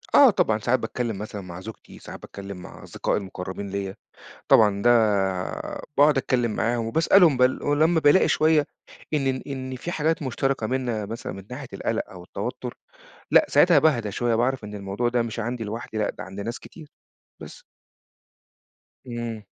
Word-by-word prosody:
آه 280 - +9
طبعًا، 110 - +2
ساعات 120 +4 +1
باتكلّم 120 -4 -3
مثلًا 105 0 -6
مع 90 -1 -9
زوجتي، 110 +2 -11
ساعات - - -10
باتكلّم 100 -1 -8
مع 90 - -11
أصدقائي - - -2
المُقرّبين 95 0 -6
ليّا. 100 0 -4 0.5
طبعًا 105 -2 +5
ده 120 - +4 1.1
باقعد 145 0 +5
أتكلّم 125 -3 +1
معاهم 115 +2 0
وباسألهم 160 - +4
بال 125 +1 +2
ولمّا 155 +3 +3
بالاقي 150 +4 +5
شوية 155 -2 +3 0.5
إن 135 -3 +1
ن 130 - -6
إن 130 -2 -5
في 170 +7 -5
حاجات 160 0 0
مشتركة 130 -2 -1
مننا 120 -4 -2
مثلًا 115 +3 -6
من 95 - -9
ناحية - - -6
القَلَق - - -2
أو 90 -2 -10
التوتُّر، 90 - -5 0.6
لأ، - - +6
ساعتها - - +5
باهدى 120 -9 +2
شوية 120 +2 0
باعرف 125 +1 0
إن 105 0 -8
الموضوع 100 +4 -2
ده 120 0 +1
مش 115 0 -5
عندي 120 +1 -3
لوحدي، 110 +1 -5
لأ، 105 - 0
ده - - -9
عند 95 +1 -8
ناس 115 +3 -4
كتير 155 -3 -13 0.5
بس. - - -11 1.4
إمم. 120 -3 -5
120 Hz, 165 wpm, -24 LUFS, 105-135 Hz, 1.4 s, آه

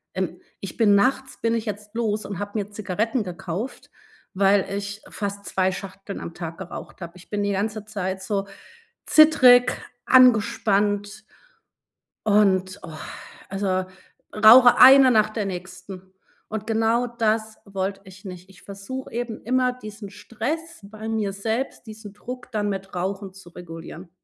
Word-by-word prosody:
ähm, - - -3 0.2
ich - - -7
bin 210 -3 +5
nachts 265 +6 +1
bin 230 0 +1
ich 230 -1 -2
jetzt 210 +1 -6
los 215 -2 -1
und 200 -3 -6
habe 205 0 -5
mir 205 0 -4
Zigaretten 215 +4 -2
gekauft, 185 +6 -6 0.4
weil 195 0 +3
ich 200 +1 -6
fast 200 0 -5
2 190 0 0
Schachteln 195 +1 -8
am 170 - -7
Tag 165 -1 -7
geraucht 190 0 -9
habe. 170 -1 -7
Ich 180 - -17
bin 205 -1 -2
die 205 - 0
ganze 210 +2 -2
Zeit 190 -3 -4
so 200 -1 -2 0.6
zittrig, 255 -6 +6 0.3
angespannt 210 -4 +3 1.0
und, 195 -2 +2
oh 175 - -8 0.6
also, 190 -1 -1 0.5
rauche 235 +4 +8
eine 265 0 +9
nach 215 -2 +3
der 215 -2 -3
nächsten. 185 0 -8 0.4
Und 215 0 -5
genau 225 +2 +1
das 220 -2 -1
wollte 195 0 -4
ich 190 0 -15
nicht. 180 0 -9
Ich 190 - -18
versuche 200 +7 -8
eben 235 -2 -4
immer, 255 +1 +1
diesen 215 -4 -10
Stress 250 - -5
bei 215 +2 -9
mir 220 -3 -1
selbst, 225 +6 -4
diesen 215 -1 -10
Druck, 245 +4 -9
dann 210 -2 -1
mit 195 -1 -5
Rauchen 190 +2 -4
zu 195 -2 -15
regulieren. 170 0 -10
205 Hz, 150 wpm, -23 LUFS, 195-225 Hz, 1.0 s, eine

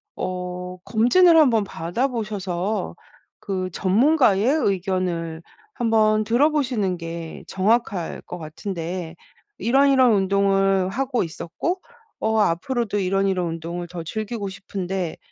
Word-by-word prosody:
어 180 0 -5
검진을 325 +10 +5
한번 240 -9 +5
받아 175 +11 -2
보셔서 210 -4 -3 0.5
그 185 -2 -3
전문가의 220 +1 +3
의견을 185 - 0 0.3
한번 215 -2 +2
들어보시는 245 -5 +1
게 165 -1 -7
정확할 200 -2 0
것 180 - -8
같은데 170 +1 -5 0.4
"이런 275 +4 +3
이런 260 -3 +5
운동을 195 -1 +2
하고 255 +2 -1
있었고 235 - -4 0.4
어 220 0 +1
앞으로도 210 +4 0
이런 195 +1 +1
이런 185 -2 0
운동을 170 +1 -5
더 175 -1 -6
즐기고 215 +4 -4
싶은데 190 -2 -4
195 Hz, 255 characters per minute, -23 LUFS, 180-230 Hz, 0.5 s, 검진을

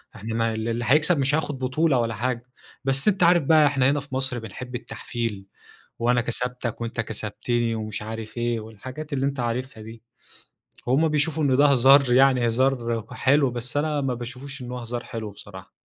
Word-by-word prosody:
إحنا 110 +2 -5
ما 115 0 0
ال 110 +1 -3
اللي 120 +1 -2
هيكسب 150 +4 +4
مش 135 +2 +3
هياخُد 145 -3 -2
بطولة 130 +2 +1
ولا 115 -1 -1
حاجة. 120 +2 -2 0.4
بس 135 +3 +3
أنت 195 -3 +3
عارف 175 -1 +5
بقى 155 +1 +5
إحنا 135 -2 +2
هنا 145 - +1
في 140 -2 -8
مصر 130 -2 -1
بنحب 125 +3 -8
التحفيل، 115 -4 -5 0.5
وأنا 120 +1 +2
كسبتك 125 0 -2
وأنت 115 0 -2
كسبتني 115 +2 -2
ومش 110 -1 -4
عارف 110 +1 -7
إيه، 120 -1 -1
والحاجات 130 +8 -8
اللي 135 -1 0
أنت 140 -1 -2
عارفها 120 -1 -3
دي. 115 +1 -11 0.8
هم 140 +6 +3
بيشوفوا 155 +1 0
إن 130 -2 +3
ده 145 +2 +6
هزار 135 -1 +5
يعني 130 -1 +4
هزار 120 0 +1 0.2
وحلو، 140 0 +2
بس 125 +3 -5
أنا 150 0 0
ما 135 -2 -1
باشوفش 130 +3 -8
إن 125 - -7
هو 125 - -4
هزار 120 0 -5
حلو 110 -3 -6
بصراحة. 95 -1 -11
125 Hz, 185 wpm, -24 LUFS, 115-140 Hz, 0.8 s, ده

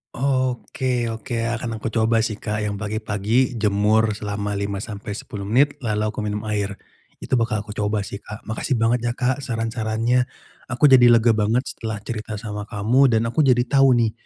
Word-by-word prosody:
Oke 130 -1 -1
oke, 115 +1 -3
akan 115 -1 -4
aku 110 - -3
coba 115 0 +2
sih, 110 -1 -1
Kak, 105 0 -3
yang 105 -1 -2
pagi-pagi, 110 +4 -1
jemur, 105 +1 +2
selama 105 -1 -4
5 100 0 -3
sampai 105 -1 -6
10 100 -2 -7
menit, 140 +6 +2
lalu 105 -4 -1
aku - - -7
minum 105 0 -3
air. 100 -2 -1 0.5
Itu 130 - +1
bakal 115 -2 0
aku 105 - -9
coba, 105 0 -1
sih, 100 +1 -7
Kak. 105 +1 -10
Makasih 110 +5 -2
banget 115 +1 +2
ya, 120 - 0
Kak, 130 +2 0
saran-sarannya. 115 0 0 0.4
Aku 130 +3 +3
jadi 125 -2 +8
lega 115 0 +5
banget, 110 +3 +1
setelah 110 -1 -5
cerita 110 -1 -5
sama 105 -1 -6
kamu, 115 +7 +3
dan 115 -3 +2
aku 155 - -2
jadi 125 -5 +4
tahu, 135 0 +4
nih, 115 -2 +2
110 Hz, 180 wpm, -22 LUFS, 105-120 Hz, 0.5 s, jadi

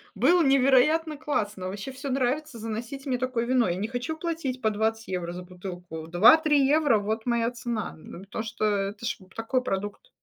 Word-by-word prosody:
было 355 0 +4
невероятно 275 +4 +4
классно, 210 -11 -2
вообще 200 +7 -5
всё 270 +1 -6
нравится, 265 +1 -1
заносите 230 +5 -5
мне 250 - +1
такое 250 -2 -1
вино. 250 -4 +3
Я 175 - 0
не 210 +5 -3
хочу 250 +6 -3
платить 315 -6 -3
по 220 - +3
20 220 +1 -1
евро 175 -2 -3
за 180 0 -7
бутылку, 180 -3 -8
2-3 280 - +6
евро- 290 -6 +4
вот 220 +2 -3
моя 235 -1 +1
цена, 240 -3 -4
ну, 170 - -11
потому 200 +3 -5
что 215 0 -5
это 205 +2 -1
ж - - -1
вот 185 0 -19
такой 240 +3 0
продукт. 205 - -4
235 Hz, 190 wpm, -27 LUFS, 205-270 Hz, -, 2-3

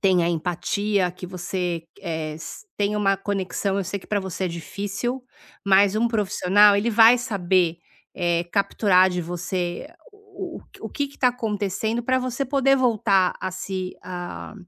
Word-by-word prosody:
tenha 180 -3 +3
empatia, 180 +3 0
que 180 +1 -9
você, 180 -2 -3 0.2
eh, 160 -4 -3
s 165 - -9
tenha 205 +1 0
uma 195 -1 +2
conexão. 195 0 -2
Eu 195 - -1
sei 200 +3 -3
que - - -16
pra 205 -1 0
você 190 0 -4
é - - 0
difícil, 205 +9 -4 0.4
mas 200 +1 +4
um 235 - +2
profissional, 205 -1 +4
ele 215 +4 +1
vai 225 +2 +7
saber, 185 -7 +1 0.4
eh, 175 -1 0
capturar 195 -2 +3
de 180 -1 -2
você 175 - -3 0.2
o - - -19 0.4
o - - -16 0.2
o - - -6
que 285 -1 -2
que 280 - -19
tá 255 - +4
acontecendo 220 -1 -2
pra 260 +2 +1
você 255 +1 -2
poder 270 0 +3
voltar 215 -7 +2
a 185 - -2
se, 185 0 -5
ah, 180 +2 -7
195 Hz, 165 wpm, -23 LUFS, 180-215 Hz, 0.4 s, vai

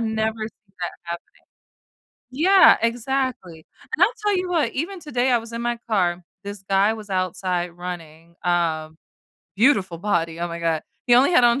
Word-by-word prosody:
never 220 -1 0
see 210 -3 -31
that 175 - -3
happening. 170 0 -8 0.9
Yeah, 370 +9 +6
exactly, 230 -8 -2 0.3
and 335 - +4
I'll 435 +5 +3
tell 415 -1 +2
you 360 0 -2
what, 315 -9 +1
even 350 +7 -3
today, 260 -4 0
I 240 - +5
was 230 0 -11
in 230 - -3
my 240 0 -1
car, 180 -4 +1 0.2
this 200 -1 -7
guy 195 +3 +3
was 215 -2 -9
outside 185 -1 -1
running, 170 -2 -9
um, 160 -3 0 0.6
beautiful 200 -7 +3
body, 170 -4 -1
oh 175 - -1
my 170 0 -5
god, 165 -2 0 0.2
he 240 - +6
only 260 +7 +5
had 250 - +6
on 240 +2 +4
205 Hz, 170 wpm, -23 LUFS, 175-245 Hz, 0.9 s, Yeah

